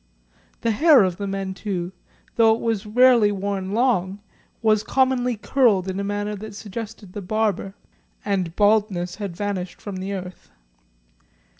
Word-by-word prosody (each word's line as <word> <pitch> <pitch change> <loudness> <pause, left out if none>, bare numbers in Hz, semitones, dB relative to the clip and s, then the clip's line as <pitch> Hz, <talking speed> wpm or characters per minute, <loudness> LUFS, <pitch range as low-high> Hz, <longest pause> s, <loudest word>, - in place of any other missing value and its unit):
The 230 - +1
hair 285 +1 +6
of 180 -2 -1
the 200 - -4
men, 195 -1 -3
too, 185 -3 -4 0.4
though 225 -1 +5
it - - -7
was 225 -2 -2
rarely 235 -1 +5
worn 195 -1 -3
long, 205 -5 +1 0.4
was 215 -1 +4
commonly 250 -1 +1
curled 210 -5 +2
in 190 +1 -3
a - - -2
manner 205 +1 -2
that 215 0 -9
suggested 210 -2 -8
the 205 - -5
barber, 200 -1 -1 0.5
and 185 -5 -1
baldness 205 -4 +2
had 200 -5 -5
vanished 195 -3 -4
from 200 -2 -6
the 190 +2 -4
earth. 185 -1 -8
205 Hz, 150 wpm, -23 LUFS, 190-220 Hz, 0.5 s, hair